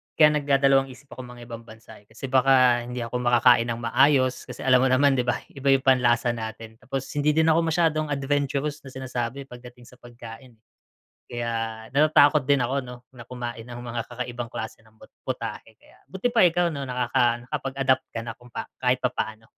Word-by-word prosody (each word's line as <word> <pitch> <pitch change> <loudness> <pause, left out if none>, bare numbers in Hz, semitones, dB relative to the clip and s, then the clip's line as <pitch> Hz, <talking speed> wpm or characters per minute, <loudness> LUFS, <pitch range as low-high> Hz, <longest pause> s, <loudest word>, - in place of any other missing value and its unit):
kaya 155 -1 +6
nagdadalawang 135 -1 +3
isip 135 +2 -15
ako 125 0 -9
mangibang 120 -1 -10
bansa, 110 0 -14
eh. 100 - -26
Kasi 115 +4 -9
baka 130 -2 +4
hindi 125 -1 -4
ako 120 +2 -4
makakain 120 -1 +4
ng 120 0 -4
maayos, 130 +1 +2
kasi - - -8
alam 130 -1 +5
mo 130 - +3
naman 135 +2 +4
'di 125 - -1
ba, 120 - +2 0.2
iba 140 0 -6
yung 135 - -2
panlasa 125 -2 +3
natin. 110 -1 -8
Tapos 135 0 -4
hindi 145 +1 +1
din 160 0 +4
ako 160 - +3
masyadong 155 -1 +1
adventurous 145 +1 -1
na - - -8
sinasabi 130 0 -4
pagdating 125 -1 -13
sa 125 +1 -18
pagkain. 120 0 -12 0.8
Kaya 115 -2 -4
natatakot 150 0 +5
din 140 +2 +2
ako 135 +2 -1
'no, 125 0 -9 0.2
na 120 - -10
kumain 120 -2 -7
ng 120 0 -9
mga 120 -1 -4
kakaibang 120 -1 -5
klase 110 0 -7
ng 110 0 -25
pu - - -15 0.2
putahe. 115 -3 -6
Kaya - - -23
buti 190 +4 -3
pa 225 - +5
ikaw 175 0 +3
'no, 140 - -5
nakaka 125 -2 0
nakapag-adapt 135 -1 -1
ka 115 - -5
na 115 - -4
kung 120 0 -19 0.3
kahit 125 0 +2
papaano. 110 -3 -3
125 Hz, 185 wpm, -24 LUFS, 120-135 Hz, 0.8 s, kaya